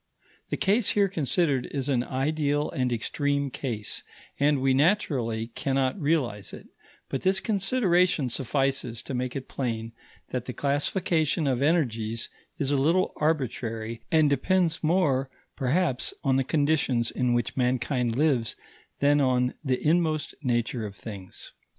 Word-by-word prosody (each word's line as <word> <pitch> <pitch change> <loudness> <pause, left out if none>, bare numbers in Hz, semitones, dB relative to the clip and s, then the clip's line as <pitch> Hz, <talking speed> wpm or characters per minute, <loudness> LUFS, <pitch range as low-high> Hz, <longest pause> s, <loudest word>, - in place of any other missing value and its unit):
The - - -1
case 205 +2 +2
here 200 -1 +3
considered 155 -5 0
is 135 -1 -3
an 130 -4 +1
ideal 145 +2 0
and 130 -6 -1
extreme 140 +4 -1
case, 115 -7 -4 0.4
and 145 0 +3
we 135 0 +2
naturally 130 - +1
cannot 135 - -1
realize 135 -10 0
it; - - -11 0.4
but 135 - -3
this 190 +1 +2
consideration 190 - +2
suffices 130 -2 -1
to - - -6
make 125 0 -2
it 135 -1 -5
plain 115 -3 -3 0.4
that 125 -2 -3
the 125 - -5
classification 155 +3 0
of 130 -2 +1
energies 115 -8 0 0.3
is 140 -1 -1
a 140 - +2
little 170 +6 +2
arbitrary 115 -7 -2
and 155 -2 +5
depends 165 +4 +1
more, 150 -6 +2 0.3
perhaps, 135 0 0
on 135 -2 +2
the 135 - +2
conditions 145 -5 +1
in 125 -1 +1
which 120 -2 -1
mankind 125 -1 0
lives 135 -5 +1 0.5
than 145 +1 +4
on 125 -1 +2
the 130 +1 0
inmost 155 -2 +1
nature 120 -2 0
of 100 -2 -6
things. 100 -4 -9
135 Hz, 140 wpm, -27 LUFS, 125-155 Hz, 0.5 s, and